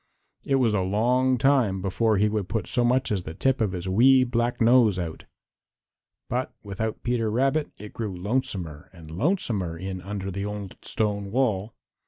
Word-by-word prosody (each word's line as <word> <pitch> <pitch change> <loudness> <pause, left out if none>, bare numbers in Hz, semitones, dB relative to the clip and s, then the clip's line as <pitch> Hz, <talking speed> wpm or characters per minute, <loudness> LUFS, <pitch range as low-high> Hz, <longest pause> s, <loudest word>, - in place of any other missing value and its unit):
It 135 - +3
was 125 -5 +2
a 100 - +1
long 125 +7 +2
time 125 -7 +2
before 105 +3 +1
he 105 +2 +3
would 105 -3 -2
put 110 -2 -1
so 125 - 0
much 125 +1 +2
as 100 -3 0
the 80 -2 -8
tip 135 -2 +1
of 105 -4 +1
his 90 0 -5
wee 130 +7 +5
black 120 -1 -1
nose 115 -4 +5
out. 85 -3 -5 1.0
But 125 +2 -3
without 105 +2 -4
Peter 120 -2 0
Rabbit 135 +7 +1
it 105 0 -10
grew 105 -5 -4
lonesomer 90 - -3
and 80 -3 -12
lonesomer 100 - -1
in 95 +1 -5
under 95 0 -5
the 100 +2 -4
old 105 -2 -5
stone 100 -2 -2
wall. 110 -3 0
105 Hz, 175 wpm, -25 LUFS, 95-125 Hz, 1.0 s, wee